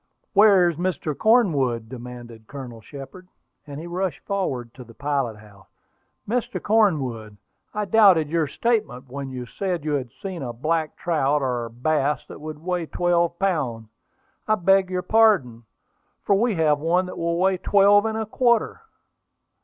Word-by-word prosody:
"Where 200 Hz, -3 st, +6 dB
is 170 Hz, -3 st, -2 dB
Mr. 170 Hz, -4 st, -2 dB
Cornwood?" 145 Hz, -, +2 dB
demanded 120 Hz, -2 st, -10 dB
Colonel 125 Hz, -5 st, -9 dB
Shepard; 140 Hz, -, -11 dB, 0.4 s
and 145 Hz, 0 st, -7 dB
he 165 Hz, -, -8 dB
rushed 180 Hz, +1 st, -3 dB
forward 130 Hz, -12 st, -3 dB
to 130 Hz, -, -11 dB
the 115 Hz, -1 st, -16 dB
pilot 140 Hz, -6 st, -2 dB
house. 100 Hz, -2 st, -18 dB, 0.6 s
"Mr. 240 Hz, +3 st, -2 dB
Cornwood, 135 Hz, -, 0 dB, 0.3 s
I 210 Hz, 0 st, -2 dB
doubted 195 Hz, -6 st, +5 dB
your 160 Hz, 0 st, 0 dB
statement 210 Hz, -, -1 dB
when 140 Hz, 0 st, -5 dB
you 125 Hz, -1 st, -6 dB
said 180 Hz, +4 st, -4 dB
you 155 Hz, -, -1 dB
had 135 Hz, -4 st, -2 dB
seen 190 Hz, -5 st, -6 dB
a 120 Hz, -3 st, -4 dB
black 155 Hz, +5 st, -1 dB
trout, 150 Hz, -4 st, 0 dB
or 120 Hz, -3 st, -2 dB
bass, 140 Hz, +3 st, -1 dB
that -, -, -10 dB
would 155 Hz, -1 st, -7 dB
weigh 180 Hz, -2 st, -2 dB
twelve 170 Hz, 0 st, +1 dB
pounds. 135 Hz, -, -1 dB, 0.6 s
I 215 Hz, -, +3 dB
beg 195 Hz, 0 st, +3 dB
your 180 Hz, -1 st, -2 dB
pardon, 180 Hz, -, +3 dB, 0.6 s
for -, -, +2 dB
we 220 Hz, +2 st, +2 dB
have 155 Hz, -3 st, +2 dB
one 175 Hz, +4 st, +1 dB
that 180 Hz, -, -8 dB
will 170 Hz, 0 st, -1 dB
weigh 190 Hz, +1 st, +2 dB
twelve 205 Hz, +3 st, +4 dB
and 220 Hz, 0 st, -2 dB
a 220 Hz, -, -2 dB
quarter." 235 Hz, -, +1 dB
160 Hz, 160 wpm, -23 LUFS, 130-195 Hz, 0.6 s, Where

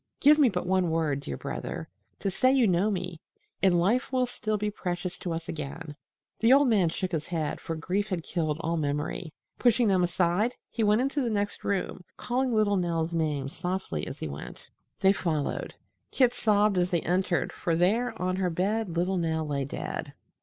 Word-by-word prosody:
Give 300 Hz, +2 st, +6 dB
me 275 Hz, -4 st, +6 dB
but 180 Hz, -4 st, -2 dB
one 185 Hz, -1 st, +2 dB
word, 160 Hz, -4 st, 0 dB
dear 70 Hz, -, -5 dB
brother, -, -, -5 dB, 0.3 s
to 195 Hz, -, 0 dB
say 255 Hz, +7 st, +3 dB
you 265 Hz, -3 st, +4 dB
know 190 Hz, +1 st, +3 dB
me, 180 Hz, -4 st, -4 dB, 0.4 s
and 180 Hz, -3 st, +4 dB
life 230 Hz, +11 st, +1 dB
will 255 Hz, -1 st, +2 dB
still 215 Hz, -3 st, -2 dB
be 210 Hz, 0 st, -1 dB
precious 180 Hz, -2 st, -3 dB
to 175 Hz, -, -4 dB
us 165 Hz, 0 st, -4 dB
again." 150 Hz, -1 st, -6 dB, 0.4 s
The 225 Hz, +2 st, +4 dB
old 280 Hz, 0 st, +6 dB
man 200 Hz, -8 st, +3 dB
shook 185 Hz, +2 st, -3 dB
his 160 Hz, -3 st, -2 dB
head, 160 Hz, -4 st, -2 dB
for 165 Hz, -, -4 dB
grief 185 Hz, +6 st, -1 dB
had 180 Hz, -4 st, -2 dB
killed 155 Hz, -4 st, -1 dB
all 165 Hz, +1 st, -1 dB
memory. 150 Hz, +3 st, -2 dB, 0.3 s
Pushing 240 Hz, -1 st, +4 dB
them 190 Hz, -2 st, +3 dB
aside, 175 Hz, +6 st, +1 dB, 0.2 s
he 230 Hz, -, -1 dB
went 210 Hz, +2 st, +4 dB
into 275 Hz, +2 st, 0 dB
the 245 Hz, -, 0 dB
next 205 Hz, -2 st, -2 dB
room, 190 Hz, -2 st, -2 dB
calling 255 Hz, +1 st, 0 dB
little 215 Hz, -3 st, +3 dB
Nell's 170 Hz, -2 st, -1 dB
name 150 Hz, -4 st, 0 dB
softly 175 Hz, -, -3 dB
as -, -, -6 dB
he -, -, -4 dB
went. 70 Hz, +1 st, -8 dB, 0.3 s
They 195 Hz, 0 st, +5 dB
followed. 160 Hz, -7 st, -2 dB, 0.3 s
Kit 250 Hz, -2 st, +3 dB
sobbed 210 Hz, -4 st, +3 dB
as 175 Hz, 0 st, +1 dB
they 170 Hz, -3 st, +1 dB
entered, 180 Hz, 0 st, 0 dB
for 170 Hz, -, -1 dB
there 210 Hz, +9 st, +1 dB
on 185 Hz, 0 st, 0 dB
her 185 Hz, -1 st, +1 dB
bed 185 Hz, +1 st, -1 dB
little 185 Hz, +2 st, +1 dB
Nell 160 Hz, -2 st, 0 dB
lay 140 Hz, -2 st, -1 dB
dead. 140 Hz, -, -5 dB
180 Hz, 195 wpm, -28 LUFS, 165-215 Hz, 0.4 s, Give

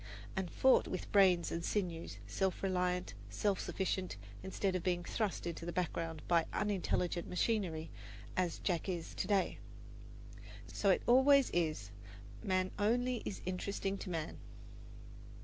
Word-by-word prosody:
and 190 Hz, -2 st, -1 dB
fought 265 Hz, +8 st, +4 dB
with 185 Hz, -, -4 dB
brains 185 Hz, -4 st, +5 dB
and 170 Hz, -, -2 dB
sinews, 170 Hz, -, -2 dB
self 185 Hz, -, -1 dB
reliant, 180 Hz, -1 st, 0 dB, 0.2 s
self 200 Hz, -3 st, 0 dB
sufficient, 185 Hz, -, -2 dB, 0.2 s
instead 190 Hz, 0 st, -1 dB
of 185 Hz, -, 0 dB
being 175 Hz, 0 st, 0 dB
thrust 205 Hz, +1 st, -2 dB
into 170 Hz, -1 st, -4 dB
the 175 Hz, -, -3 dB
background 165 Hz, -2 st, -2 dB
by 170 Hz, -1 st, +4 dB
unintelligent 180 Hz, -4 st, 0 dB
machinery, 180 Hz, -5 st, 0 dB, 0.4 s
as 180 Hz, -2 st, 0 dB
Jack 180 Hz, 0 st, -1 dB
is 175 Hz, -3 st, -3 dB
to -, -, -2 dB
day. 200 Hz, -3 st, +1 dB, 1.1 s
So 200 Hz, -, 0 dB
it 190 Hz, -, +4 dB
always 265 Hz, +2 st, +6 dB
is 155 Hz, -12 st, 0 dB, 0.5 s
"man 185 Hz, -1 st, +1 dB
only 245 Hz, +3 st, +2 dB
is 195 Hz, -, -4 dB
interesting 195 Hz, +1 st, -2 dB
to -, -, -6 dB
man." 165 Hz, -3 st, -3 dB
185 Hz, 135 wpm, -35 LUFS, 170-200 Hz, 1.1 s, always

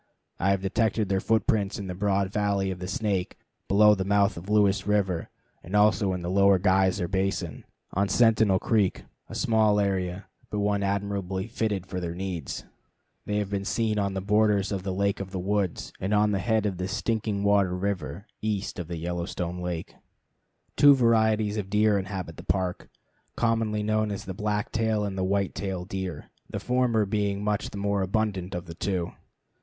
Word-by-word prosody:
I 95 Hz, -, +2 dB
have 100 Hz, -1 st, +1 dB
detected 110 Hz, +1 st, +1 dB
their 95 Hz, -1 st, +2 dB
footprints 105 Hz, -1 st, +1 dB
in 100 Hz, -, -5 dB
the 90 Hz, -, -4 dB
broad 100 Hz, 0 st, 0 dB
valley 100 Hz, -2 st, +1 dB
of 90 Hz, -, -6 dB
the 90 Hz, -, -5 dB
Snake, 100 Hz, -4 st, -1 dB, 0.3 s
below 105 Hz, +1 st, +6 dB
the 95 Hz, -2 st, -1 dB
mouth 100 Hz, +1 st, +2 dB
of 85 Hz, +4 st, -9 dB
Lewis 105 Hz, -2 st, +3 dB
River, 95 Hz, -5 st, 0 dB, 0.3 s
and 90 Hz, +4 st, -5 dB
also 105 Hz, -1 st, +4 dB
in 90 Hz, -1 st, -4 dB
the 85 Hz, -, -3 dB
Lower 100 Hz, 0 st, +5 dB
Geyser 95 Hz, 0 st, +2 dB
Basin, 95 Hz, -4 st, -2 dB, 0.3 s
on 100 Hz, +1 st, +1 dB
Sentinel 110 Hz, -3 st, +4 dB
Creek, 105 Hz, -2 st, +1 dB, 0.3 s
a -, -, -7 dB
small 110 Hz, -2 st, +3 dB
area, 95 Hz, -1 st, -1 dB, 0.2 s
but 105 Hz, -, -3 dB
one 100 Hz, 0 st, +1 dB
admirably 100 Hz, -1 st, -2 dB
fitted 110 Hz, -4 st, -2 dB
for 90 Hz, 0 st, -4 dB
their 85 Hz, -1 st, -4 dB
needs. 90 Hz, -5 st, -4 dB, 0.6 s
They 105 Hz, -, 0 dB
have 105 Hz, -1 st, -2 dB
been 100 Hz, -1 st, -1 dB
seen 110 Hz, +1 st, 0 dB
on 100 Hz, -1 st, -1 dB
the 95 Hz, -, -2 dB
borders 105 Hz, -1 st, +2 dB
of 100 Hz, -2 st, -2 dB
the 95 Hz, 0 st, -3 dB
Lake 100 Hz, +1 st, 0 dB
of 100 Hz, -1 st, -5 dB
the 95 Hz, -, -5 dB
Woods, 95 Hz, -1 st, -1 dB
and 100 Hz, +3 st, 0 dB
on 105 Hz, 0 st, +3 dB
the 100 Hz, -, 0 dB
head 110 Hz, +2 st, +1 dB
of 95 Hz, -3 st, -2 dB
Stinking 105 Hz, -1 st, -1 dB
Water 100 Hz, -3 st, +3 dB
River 90 Hz, -2 st, -3 dB, 0.2 s
east 105 Hz, -2 st, -2 dB
of 85 Hz, -2 st, -5 dB
Yellowstone 85 Hz, +1 st, -3 dB
Lake. 90 Hz, -2 st, -4 dB, 0.8 s
Two 145 Hz, -1 st, +8 dB
varieties 110 Hz, -3 st, +2 dB
of 100 Hz, -2 st, -3 dB
deer 105 Hz, 0 st, +3 dB
inhabit 95 Hz, -4 st, -5 dB
the -, -, -9 dB
Park, 90 Hz, -2 st, -2 dB, 0.5 s
commonly 115 Hz, -2 st, +1 dB
known 110 Hz, 0 st, +1 dB
as 100 Hz, -, -5 dB
the 95 Hz, -, -5 dB
black 105 Hz, +1 st, -2 dB
tail 110 Hz, -2 st, +1 dB
and 100 Hz, -1 st, -4 dB
white 95 Hz, +1 st, 0 dB
tail 95 Hz, -3 st, -4 dB
deer, 95 Hz, -5 st, -5 dB, 0.2 s
the -, -, -4 dB
former 125 Hz, -4 st, +1 dB
being 100 Hz, 0 st, -1 dB
much 105 Hz, -1 st, -1 dB
the -, -, -8 dB
more 100 Hz, 0 st, 0 dB
abundant 95 Hz, -1 st, -1 dB
of 90 Hz, +1 st, -4 dB
the 85 Hz, -, -8 dB
two. 90 Hz, 0 st, -2 dB
100 Hz, 180 wpm, -27 LUFS, 95-105 Hz, 0.8 s, Two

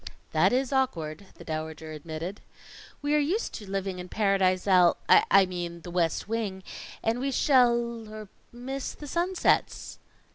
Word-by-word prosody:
"That -, -, +3 dB
is 260 Hz, +2 st, 0 dB
awkward," 190 Hz, -, -1 dB
the -, -, -12 dB
Dowager 160 Hz, 0 st, -5 dB
admitted. 160 Hz, +5 st, -6 dB, 0.6 s
"We 290 Hz, +1 st, +1 dB
are 300 Hz, -, +4 dB
used 350 Hz, +11 st, -1 dB
to 205 Hz, -3 st, -8 dB
living 195 Hz, -1 st, -3 dB
in 180 Hz, 0 st, -8 dB
Paradise 195 Hz, -3 st, +1 dB
Al 180 Hz, -3 st, +5 dB
I 195 Hz, -1 st, +6 dB
mean, 175 Hz, -2 st, -5 dB
the 175 Hz, -, -9 dB
West 170 Hz, 0 st, 0 dB
Wing 210 Hz, -4 st, -3 dB, 0.4 s
and 225 Hz, +2 st, 0 dB
we 275 Hz, +2 st, -1 dB
shall 235 Hz, -5 st, +2 dB
er 215 Hz, -1 st, -8 dB, 0.2 s
miss 260 Hz, +3 st, -5 dB
the 295 Hz, -, -10 dB
sunsets." 350 Hz, +5 st, 0 dB
195 Hz, 150 wpm, -27 LUFS, 175-250 Hz, 0.6 s, I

